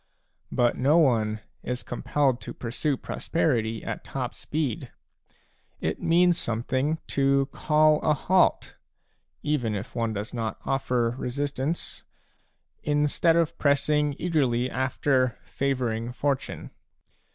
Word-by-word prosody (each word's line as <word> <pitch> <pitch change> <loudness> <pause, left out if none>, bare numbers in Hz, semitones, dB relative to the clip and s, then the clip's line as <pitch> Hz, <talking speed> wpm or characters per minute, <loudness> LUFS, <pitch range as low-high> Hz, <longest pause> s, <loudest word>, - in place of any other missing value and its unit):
But 120 -1 +2
no 140 +6 +4
one 110 -8 +2 0.2
is 125 +1 -4
compelled 130 0 0
to - - -7
pursue 130 +4 -2
prosperity 115 -10 -1
at - - -5
top 130 -2 -4
speed; 145 -7 -3 0.9
it - - -2
means 175 +1 +4
some 115 0 -2
thing 140 +5 0
to 140 0 +3
call 155 0 +3
a 150 - +3
halt, 185 +6 +2 0.3
— - - -43 0.3
even 125 -8 0
if 105 +4 -6
one 115 -2 0
does 105 +1 -5
not 115 -2 -3
offer 125 -3 +1
re - - -2
sistance, 145 +4 -3 0.4
— - - -46 0.2
instead 150 +3 +2
of 165 -2 +2
pressing 145 0 +2
eagerly 130 -8 +1
after 130 -1 +1
favouring 125 -4 -2
fortune. 135 +1 -2
135 Hz, 125 wpm, -26 LUFS, 120-150 Hz, 0.9 s, no